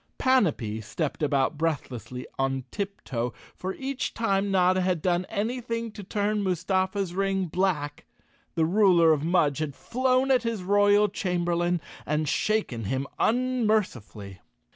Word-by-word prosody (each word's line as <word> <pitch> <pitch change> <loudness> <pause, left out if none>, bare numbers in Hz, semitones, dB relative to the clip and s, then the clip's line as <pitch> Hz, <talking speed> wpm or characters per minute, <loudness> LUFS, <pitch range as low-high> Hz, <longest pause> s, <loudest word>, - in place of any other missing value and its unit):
Panapee 155 - +1
stepped 140 +10 -3
about 145 0 +1
breathlessly 130 -6 -3
on 135 0 0
tiptoe, 135 - -3 0.2
for 190 +1 -5
each 270 0 -3
time 200 -3 +1
Notta 185 -1 +3
had 180 -2 +1
done 175 +2 0
anything 230 +1 -2
to 210 - -9
turn 205 +1 -1
Mustafa's 190 0 0
ring 195 0 0
black 160 -4 -1 0.5
the 165 -2 +3
ruler 175 -3 +5
of 150 -1 -1
Mudge 155 -4 +2
had 150 -3 -3
flown 255 +2 +1
at 255 -2 +4
his 230 -5 -3
royal 205 +2 +4
chamberlain 175 -3 0 0.2
and 150 0 -1
shaken 140 - 0
him 130 +6 -1
unmercifully. 215 - 0
185 Hz, 130 wpm, -27 LUFS, 150-210 Hz, 0.5 s, ruler